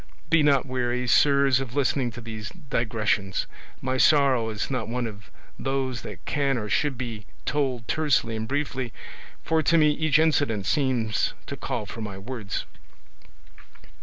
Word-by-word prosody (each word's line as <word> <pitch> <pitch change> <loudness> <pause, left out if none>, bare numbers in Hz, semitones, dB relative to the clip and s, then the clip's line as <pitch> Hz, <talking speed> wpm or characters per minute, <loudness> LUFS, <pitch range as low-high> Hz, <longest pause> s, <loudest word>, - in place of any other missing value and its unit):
Be 165 -1 +6
not 140 -3 +4
weary, 125 -1 -1
sirs, 140 0 +5
of 130 -2 -5
listening 135 -2 +1
to 120 - -8
these 110 -2 -6
digressions; 110 - -1 0.4
my 130 0 0
sorrow 130 -5 +4
is 110 +4 -3
not 130 - -2
one 120 +1 -2
of 105 -3 -8 0.3
those 135 -4 -1
that - - -9
can 140 -3 +1
or 105 -2 -4
should 145 +3 +1
be 115 -4 -5 0.2
told 130 -5 -1
tersely 145 -7 +1
and 110 0 -3
briefly, 135 -4 -2 0.5
for 160 0 +2
to 165 +2 +3
me 150 -2 +5
each 155 -1 +2
incident 145 -10 +2
seems 115 -1 +1
to - - -5
call 105 - -3
for 115 +2 -8
many 105 -3 -5
words." 105 -1 -5
130 Hz, 155 wpm, -26 LUFS, 110-140 Hz, 0.5 s, Be